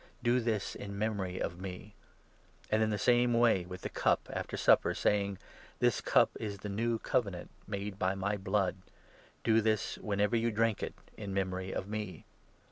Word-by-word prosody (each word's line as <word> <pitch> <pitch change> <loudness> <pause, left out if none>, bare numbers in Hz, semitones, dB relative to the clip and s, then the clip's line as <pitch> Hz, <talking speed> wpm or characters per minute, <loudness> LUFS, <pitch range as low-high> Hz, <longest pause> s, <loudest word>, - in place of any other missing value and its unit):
Do 120 +1 +4
this 110 -4 -1
in 100 0 -7
memory 100 -4 -1
of 85 +1 -3
me." 95 +2 -7 0.8
And 110 - +4
25 - - +1
in 110 - +3
the 105 - 0
same 120 +3 +4
way 115 -6 +4
with 90 0 -7
the - - -4
cup, - - +1
after - - -3
supper, - - +4
saying 100 -1 +1 0.2
" - - -22
This - - +2
cup - - +4
is 105 -2 -4
the 105 +2 -6
new 115 +3 0
Covenant 105 -7 -1 0.2
made 100 -1 -4
by 95 +1 +1
my 100 +2 -1
blood. 95 -1 0 0.7
Do 115 -1 +4
this, 110 -1 0
whenever 105 +2 +1
you 115 0 +2
drink 110 -1 +1
it, - - -4 0.2
in 100 -2 -5
memory 95 -1 -1
of 95 - -3
me." 105 -3 -5
105 Hz, 185 wpm, -32 LUFS, 95-110 Hz, 0.8 s, Do